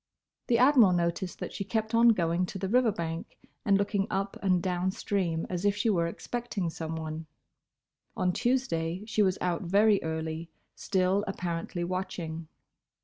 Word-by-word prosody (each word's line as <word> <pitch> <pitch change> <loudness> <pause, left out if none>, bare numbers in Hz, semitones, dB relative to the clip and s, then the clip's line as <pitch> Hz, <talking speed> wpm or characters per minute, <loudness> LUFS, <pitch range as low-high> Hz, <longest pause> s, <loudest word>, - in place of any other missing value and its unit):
The 235 - +3
Admiral 250 -6 +6
noticed 175 +1 -1
that - - -6
she 200 - -3
kept 220 +2 -2
on 230 +1 +6
going 175 -3 +2
to - - -6
the 190 0 -2
river 240 +2 +3
bank 165 -3 -5 0.3
and 200 -1 +4
looking 200 0 0
up 195 +1 -2
and 185 -2 +3
down 180 +1 0
stream 185 -4 -1
as 180 0 -3
if 205 0 +3
she 225 +1 +1
were 170 -4 +1
expecting 210 -1 -4
someone. 160 -1 -5 0.9
On 180 -1 +1
Tuesday 205 -9 0
she 215 -1 0
was 190 -2 +3
out 175 -2 0
very 200 +3 +4
early, 160 +1 -4 0.2
still 190 +1 +1
apparently 175 -2 -3
watching. 170 -3 -4
185 Hz, 155 wpm, -29 LUFS, 170-205 Hz, 0.9 s, Admiral